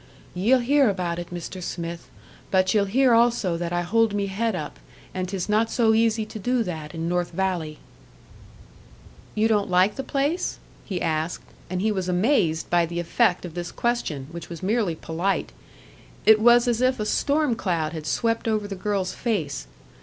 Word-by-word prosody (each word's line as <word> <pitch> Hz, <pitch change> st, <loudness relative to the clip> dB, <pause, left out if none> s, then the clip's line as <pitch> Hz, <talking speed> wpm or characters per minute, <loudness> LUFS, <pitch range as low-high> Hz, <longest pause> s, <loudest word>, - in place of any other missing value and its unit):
"Ye'll 215 Hz, +9 st, +3 dB
hear 275 Hz, 0 st, +4 dB
about 175 Hz, -3 st, -2 dB
it, 175 Hz, -, -7 dB
Mr. 180 Hz, +1 st, -6 dB
Smith; 170 Hz, -1 st, -5 dB, 0.4 s
but 185 Hz, -1 st, +2 dB
ye'll 205 Hz, -2 st, +3 dB
hear 250 Hz, +5 st, +3 dB
also 230 Hz, -6 st, +3 dB
that 170 Hz, 0 st, -3 dB
I 175 Hz, 0 st, 0 dB
hold 225 Hz, +3 st, +2 dB
me 200 Hz, -1 st, 0 dB
head 210 Hz, +2 st, -1 dB
up. 150 Hz, -4 st, -6 dB, 0.3 s
And 185 Hz, -1 st, -3 dB
'tis 190 Hz, -2 st, -3 dB
not 215 Hz, +2 st, +2 dB
so 225 Hz, -2 st, +3 dB
easy 225 Hz, 0 st, +2 dB
to 215 Hz, -, -8 dB
do 245 Hz, +3 st, +1 dB
that 160 Hz, -6 st, -6 dB
in 165 Hz, 0 st, -3 dB
North 175 Hz, 0 st, 0 dB
Valley." 170 Hz, -4 st, -2 dB, 1.6 s
"You 215 Hz, +1 st, +3 dB
don't 210 Hz, -3 st, +1 dB
like 185 Hz, +3 st, +3 dB
the 270 Hz, -, -3 dB
place?" 285 Hz, +6 st, -1 dB, 0.3 s
he 185 Hz, -4 st, -3 dB
asked; 160 Hz, +1 st, -2 dB, 0.3 s
and 185 Hz, 0 st, -2 dB
he 220 Hz, -, +2 dB
was 190 Hz, -3 st, -2 dB
amazed 180 Hz, -, +2 dB
by 175 Hz, -1 st, +2 dB
the 170 Hz, +1 st, -4 dB
effect 180 Hz, +2 st, +1 dB
of 170 Hz, -, -8 dB
this 175 Hz, 0 st, -5 dB
question, 235 Hz, -, -2 dB
which 170 Hz, -1 st, -8 dB
was 170 Hz, -1 st, -8 dB
merely 205 Hz, -4 st, +1 dB
polite. 170 Hz, +5 st, -2 dB, 0.7 s
It 220 Hz, 0 st, +7 dB
was 240 Hz, +2 st, +5 dB
as 240 Hz, 0 st, +1 dB
if 255 Hz, -1 st, +2 dB
a 215 Hz, -, -1 dB
storm 290 Hz, +4 st, +1 dB
cloud 170 Hz, -6 st, -1 dB
had 155 Hz, -2 st, -6 dB
swept 230 Hz, -1 st, 0 dB
over 215 Hz, -2 st, 0 dB
the 200 Hz, -, -5 dB
girl's 195 Hz, -1 st, -2 dB
face. 165 Hz, -, -2 dB
195 Hz, 185 wpm, -24 LUFS, 175-225 Hz, 1.6 s, It